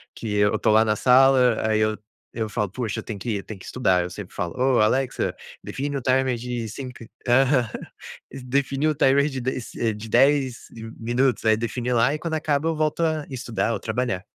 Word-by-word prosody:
que 105 -3 -4
eu 105 0 +3
tô 110 - +2
lá 110 +1 +5
na 105 0 +1
sala, 125 -2 +4
aí 110 0 +2
eu 110 0 +1 0.4
eu 110 -2 -2
falo: 105 -2 -2
"Poxa, 115 -3 -3
eu - - -7
tenho 105 -4 -6
que 120 - -5
ir, 105 - 0
eu 100 - -6
tenho 105 -3 -9
que - - -12
estudar". 95 -8 +1
Eu 90 - -5
sempre 95 +1 -9
falo: 90 -3 -4
"Oh, 130 0 +3
Alexa, 125 +4 +1 0.3
define 145 +1 -4
o - - -4
timer 130 0 +2
de 120 -1 -4
cinco" 125 +1 -8 0.2
Aham. 125 -1 +3 0.6
Define 135 +2 -1
o 155 - +1
timer 140 +2 +3
de 135 -2 -5
de 130 0 -2
se 115 0 -3
de 105 +1 -9
10 135 +1 +2
de 110 -1 -9
minutos. 120 +3 0
Aí, 110 0 +5
define 120 +2 -2
lá. 120 +4 +3
E 155 - -3
quando 165 -2 -4
acaba, 150 -1 0
eu 165 - 0
volto 155 +1 -1
a 155 -2 0
estudar 120 -3 -2
ou - - -3
trabalhar. 110 -4 -2
125 Hz, 215 wpm, -23 LUFS, 110-135 Hz, 0.6 s, lá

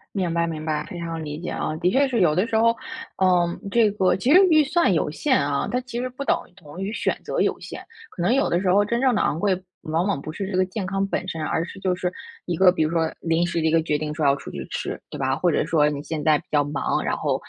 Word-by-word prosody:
明 180 -4 -1
白 170 0 +1
明 155 -2 -5
白， 155 -1 -1
非 180 - -7
常 165 -1 -4
理 150 0 -5
解 175 - -4
啊。 155 - -3
的 180 - +3
确 275 +5 +3
是 235 -6 0
有 155 -4 +4
的 185 +7 +1
时 225 - -2
候， 230 +1 +5 0.5
嗯， 175 -2 +2
这 220 -1 +3
个， 190 -3 +2
其 245 +9 +2
实 370 - +8
预 310 -1 +6
算 300 - +2
有 150 -2 0
限 260 - +1
啊， 140 0 0
它 250 - 0
其 240 -1 -6
实 255 +1 -2
不 260 +3 -6
等 - - +2 0.2
同 170 0 -11
于 200 +2 -3
选 - - -1
择 - - -2
有 - - +1
限， - - -9 0.3
可 175 - -7
能 185 +7 +3
有 275 +1 +2
的 175 +2 +1
时 185 -2 +2
候 205 +2 +4
真 235 +3 -1
正 260 -2 +3
地 215 - +1
昂 155 - 0
贵， 185 0 0 0.2
往 165 +3 -1
往 195 -9 -1
不 155 - -6
是 195 +3 -5
这 185 - -3
个 185 - +4
健 190 +1 -5
康 195 +1 -1
本 190 - -3
身， 165 -3 -4
而 165 - -1
是 195 - -11
就 185 -1 +1
是 180 0 -2 0.3
一 175 - -2
个， 185 +1 +6
比 170 - 0
如 155 - -1
说 165 -1 0
临 165 +1 +1
时 170 -1 -2
的 160 - +1
一 - - +2
个 165 0 +4
决 150 -2 0
定 150 0 -4
说 155 - -1
要 140 - +5
出 - - -9
去 - - -6
吃， - - -4
对 - - -7
吧？ 135 0 0
或 175 +3 +1
者 - - +1
说 150 -2 +3
你 145 -1 -4
现 155 0 -4
在 155 -2 +4
比 - - -18
较 145 -1 +2
忙， 145 0 -1
然 - - -1
后， - - 0
180 Hz, 315 characters per minute, -23 LUFS, 160-205 Hz, 0.5 s, 实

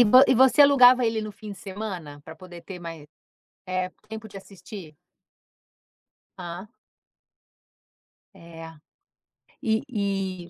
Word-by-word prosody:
E - - +8
vo 255 +4 +7
e 260 - +5
você 260 +3 +5
alugava 255 -3 +7
ele 225 -1 -1
no 215 0 -6
fim 210 +1 -10
de 195 - -12
semana, 185 -7 -7
pra 160 +2 -12
poder 175 0 -12
ter 180 +1 -9
mais, 165 -3 -9 0.6
eh, 185 0 -2 0.2
tempo 220 0 -8
de 200 - -16
assistir? 190 -4 -11 1.4
Hã. 175 +2 -7 1.7
É. 165 -1 -11 1.0
E 220 -1 +1
e 195 -5 -3
195 Hz, 125 wpm, -25 LUFS, 175-220 Hz, 1.7 s, E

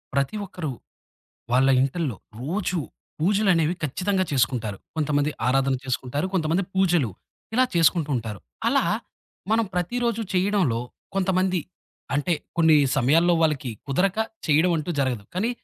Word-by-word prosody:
ప్రతి 140 +9 0
ఒక్కరు, 165 -6 -5 0.8
వాళ్ళ 130 +2 +4
ఇంటిల్లో 135 - -1 0.2
రోజు 180 +5 -1 0.4
పూజలనేవి 180 -3 +3
ఖచ్చితంగా 185 +6 0
చేసుకుంటారు. 120 -6 0 0.2
కొంతమంది 150 -1 +1 0.2
ఆరాధన 135 +1 +2
చేసుకుంటారు, 130 +4 -2
కొంతమంది 170 +1 +1
పూజలు, 175 - +2 0.4
ఇలా 255 +2 +5
చేసుకుంటూ 165 -2 +3
ఉంటారు. 110 -4 -5 0.3
అలా - - +3 0.7
మనం 225 +1 +3
ప్రతిరోజు 230 +5 0
చేయడంలో 185 - +2 0.3
కొంతమంది, 185 -1 +1 0.6
అంటే 155 +4 +1 0.2
కొన్ని 160 -2 +6 0.2
సమయాల్లో 160 +7 +4
వాళ్ళకి 150 -5 +1 0.2
కుదరక 185 +9 +1 0.3
చేయడం 160 +4 +4
అంటూ 155 +2 -3
జరగదు. 125 -6 -1
కానీ 215 +6 +1
160 Hz, 115 wpm, -24 LUFS, 135-185 Hz, 0.8 s, కొన్ని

